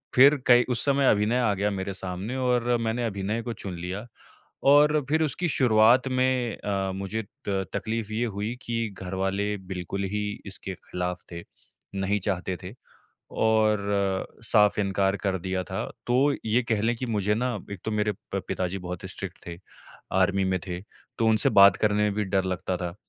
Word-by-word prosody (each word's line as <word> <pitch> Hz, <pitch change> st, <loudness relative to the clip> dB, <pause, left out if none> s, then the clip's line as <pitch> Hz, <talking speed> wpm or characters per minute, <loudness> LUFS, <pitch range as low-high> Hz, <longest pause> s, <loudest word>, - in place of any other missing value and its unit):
फिर 140 Hz, +4 st, +8 dB
कई 120 Hz, 0 st, +7 dB
उस 120 Hz, -2 st, +1 dB
समय 140 Hz, -1 st, +3 dB
अभिनय 105 Hz, +4 st, +2 dB
आ 110 Hz, -4 st, +2 dB
गया 100 Hz, +1 st, 0 dB
मेरे 95 Hz, 0 st, -3 dB
सामने 95 Hz, +5 st, -4 dB
और 125 Hz, -1 st, +1 dB
मैंने 115 Hz, +1 st, -1 dB
अभिनय 105 Hz, +1 st, -2 dB
को 120 Hz, -1 st, -4 dB
चुन 95 Hz, -3 st, -7 dB
लिया 95 Hz, +5 st, -5 dB, 0.7 s
और 150 Hz, +1 st, +6 dB
फिर 160 Hz, +2 st, +3 dB
उसकी 165 Hz, +4 st, -1 dB
शुरुआत 120 Hz, -2 st, +4 dB
में 130 Hz, -3 st, +1 dB
अ, 100 Hz, -2 st, -2 dB
मुझे 100 Hz, +3 st, -3 dB, 0.3 s
त 95 Hz, -1 st, 0 dB
तकलीफ़ 110 Hz, -1 st, -3 dB
ये 115 Hz, +2 st, 0 dB
हुई 105 Hz, +1 st, -3 dB
कि 115 Hz, -2 st, -2 dB
घरवाले 95 Hz, +2 st, -2 dB
बिल्कुल 95 Hz, 0 st, -5 dB
ही 105 Hz, 0 st, -1 dB, 0.2 s
इसके 95 Hz, -1 st, -6 dB
ख़िलाफ़ 90 Hz, 0 st, -4 dB
थे, 85 Hz, 0 st, -6 dB, 0.5 s
नहीं 100 Hz, +1 st, 0 dB
चाहते 95 Hz, -1 st, -2 dB
थे 90 Hz, +3 st, -7 dB, 0.6 s
और 100 Hz, -3 st, +1 dB, 0.2 s
साफ़ 105 Hz, -3 st, +4 dB
इनकार 95 Hz, 0 st, +1 dB
कर 95 Hz, -2 st, -1 dB
दिया 95 Hz, +1 st, -2 dB
था। -, -, -4 dB, 0.2 s
तो 120 Hz, -, +2 dB, 0.3 s
ये 115 Hz, +3 st, +2 dB
कह 110 Hz, -3 st, -1 dB
लें 115 Hz, +2 st, +2 dB
कि 130 Hz, -, -4 dB
मुझे 105 Hz, -2 st, 0 dB
ना 125 Hz, +2 st, -1 dB, 0.2 s
एक 100 Hz, -, -7 dB
तो -, -, -2 dB
मेरे 105 Hz, 0 st, 0 dB, 0.2 s
प 100 Hz, -, 0 dB
पिताजी 95 Hz, 0 st, -2 dB
बहुत 90 Hz, -1 st, -6 dB
स्ट्रिक्ट 95 Hz, -2 st, -6 dB
थे, 85 Hz, -1 st, -7 dB, 0.5 s
आर्मी 95 Hz, +1 st, +2 dB
में 95 Hz, 0 st, +1 dB
थे, 90 Hz, -1 st, -4 dB, 0.4 s
तो 115 Hz, -, +2 dB
उनसे 110 Hz, -2 st, +3 dB
बात 100 Hz, 0 st, +8 dB
करने 105 Hz, -1 st, +2 dB
में 105 Hz, -1 st, +2 dB
भी 105 Hz, 0 st, 0 dB
डर 95 Hz, -1 st, 0 dB
लगता 95 Hz, 0 st, -2 dB
था। 90 Hz, -1 st, -4 dB
105 Hz, 180 wpm, -26 LUFS, 95-115 Hz, 0.7 s, फिर